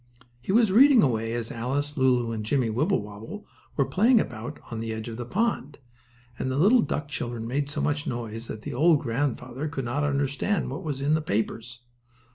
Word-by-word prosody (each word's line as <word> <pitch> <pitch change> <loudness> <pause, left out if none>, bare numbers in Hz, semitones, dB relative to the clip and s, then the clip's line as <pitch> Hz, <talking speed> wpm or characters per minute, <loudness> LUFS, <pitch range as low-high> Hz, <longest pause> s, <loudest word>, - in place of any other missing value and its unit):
He 125 - -3
was 220 -1 +4
reading 255 +2 +7
away 115 -4 0
as 115 -1 -3
Alice, 140 +5 -2
Lulu 125 -4 +2
and 110 -1 -3
Jimmie 120 0 +1
Wibblewobble 115 - -2 0.3
were 140 - +3
playing 215 - +4
about 115 - -5
on 115 - -4
the 115 0 -3
edge 110 +1 -5
of 115 -1 -6
the 120 -1 -5
pond, 180 - -1 0.6
and 130 - -1
the 130 - -1
little 215 - +5
duck 150 -8 -2
children 120 -5 -4
made 140 +4 -1
so 145 - -3
much 145 0 -1
noise 115 -1 -4
that 110 - -7
the 145 - -5
old 155 +3 +4
grandfather 130 +2 -2
could 140 -4 -4
not 135 +5 -1
understand 145 +6 0
what 165 - -5
was 145 -6 -4
in 145 +2 +2
the 155 - +2
papers. 115 -1 -3
135 Hz, 195 wpm, -26 LUFS, 115-150 Hz, 0.6 s, reading